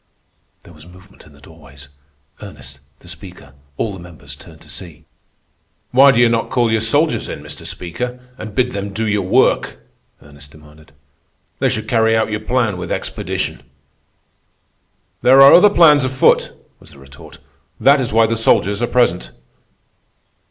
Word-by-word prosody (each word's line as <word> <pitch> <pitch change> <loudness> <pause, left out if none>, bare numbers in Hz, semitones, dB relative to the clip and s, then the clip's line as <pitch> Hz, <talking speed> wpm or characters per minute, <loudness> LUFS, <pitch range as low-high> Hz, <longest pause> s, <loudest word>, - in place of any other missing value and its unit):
There 85 - -17
was 75 +1 -16
movement 90 0 -18
in 75 - -20
the 70 - -20
doorways. 70 -3 -15 0.5
Ernest, 70 +2 -11 0.2
the - - -18
Speaker, 85 -5 -10 0.2
all 110 -3 -3
the 95 - -10
members 75 -5 -12
turned - - -16
to - - -14
see. 85 -5 -10 0.9
"Why 135 +2 +6
do 120 - 0
you 120 - +5
not 115 -1 -1
call 120 -3 0
your 110 -1 0
soldiers 145 +8 +1
in, - - -8
Mr. - - -7
Speaker, 120 +9 -6 0.2
and 110 -5 -10
bid 125 -1 0
them 100 -1 -6
do 110 +2 -2
their 105 -1 0
work?" 95 - +1 0.4
Ernest 70 0 -15
demanded. 75 0 -19 0.7
"They - - +1
should 110 0 -4
carry 115 -1 +2
out 110 0 -1
your 105 - -2
plan 120 -6 -1
with 90 - -7
expedition." - - -4 1.6
"There 130 +2 +5
are 135 0 +8
other 195 +4 +7
plans 155 -7 +5
afoot," 130 0 +1 0.3
was - - -17
the - - -17
retort. 70 0 -15 0.4
"That 140 +1 +4
is 125 - -3
why 115 +1 +3
the 115 +1 -1
soldiers 105 -2 +1
are 120 - 0
present." 120 - 0
105 Hz, 165 wpm, -17 LUFS, 80-120 Hz, 1.6 s, are